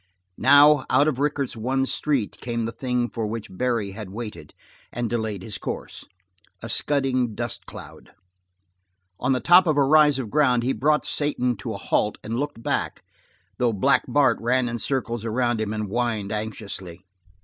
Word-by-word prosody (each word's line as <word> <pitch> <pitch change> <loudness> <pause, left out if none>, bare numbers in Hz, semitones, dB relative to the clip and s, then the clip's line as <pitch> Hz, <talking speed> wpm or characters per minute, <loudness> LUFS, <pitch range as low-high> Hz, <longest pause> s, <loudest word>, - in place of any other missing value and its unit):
Now, 145 +1 +6
out 140 +4 +4
of 140 -4 -1
Rickett's 145 -3 -1
one 130 +4 0
street, 135 -5 -1
came 115 -1 -2
the 115 - -3
thing 125 -1 -1
for 115 -1 -4
which 110 -3 -6
Barry 115 -2 -1
had 105 -1 -8
waited, 110 +2 -8 0.4
and 120 0 -2
delayed 110 -4 -3
his 100 -1 -6
course - - -6 0.6
a 115 - -6
scudding 130 -3 0
dust 120 -2 -5
cloud. - - -12 1.1
On 130 +2 +1
the 130 - 0
top 180 +4 +6
of 155 -2 +2
a 140 - +5
rise 150 0 +5
of 120 -6 -5
ground 125 -4 +3
he 130 +2 +1
brought 150 +2 +1
Satan 125 -4 0
to 95 - -5
a - - -5
halt 105 - 0
and 115 +3 -3
looked 145 -5 -4
back, - - -2 0.6
though 120 -2 +2
Black 135 +8 +3
Bart 135 -5 +3
ran 125 +2 +1
in 120 0 -3
a - - -10
circle 120 -4 -2
around 120 0 0
him, 105 -1 -2
and 110 0 -2
whined 110 -2 -2
anxiously. 100 -5 -5
120 Hz, 175 wpm, -24 LUFS, 110-135 Hz, 1.1 s, Now